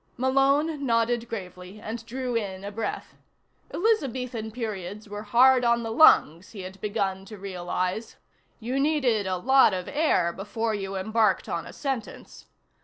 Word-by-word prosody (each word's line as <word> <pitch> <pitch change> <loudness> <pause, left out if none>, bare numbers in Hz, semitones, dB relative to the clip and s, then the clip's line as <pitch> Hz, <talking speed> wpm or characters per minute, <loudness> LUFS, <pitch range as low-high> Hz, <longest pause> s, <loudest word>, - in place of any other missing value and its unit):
Malone 275 +4 +2
nodded 235 -1 +1
gravely 185 -2 -8
and 225 +2 -6
drew 255 0 -3
in 195 -4 -3
a 200 - -5
breath. 225 +2 -4 0.6
Elizabethan 255 - -1
periods 210 -3 -6
were 205 0 -6
hard 250 +4 +5
on 235 0 +2
the 225 - -4
lungs, 185 - +5
he 200 - -7
had 185 +1 -9
begun 200 -3 -2
to 215 +2 -10
realize: 185 +2 -3 0.4
you 250 +4 -2
needed 265 -9 +1
a 185 -1 -1
lot 260 0 +4
of 180 -1 -5
air 285 - +1
before 220 +4 -3
you 195 -1 -4
embarked 215 0 +1
on 165 - -3
a - - -9
sentence. 270 -6 -6
220 Hz, 150 wpm, -26 LUFS, 195-255 Hz, 0.6 s, hard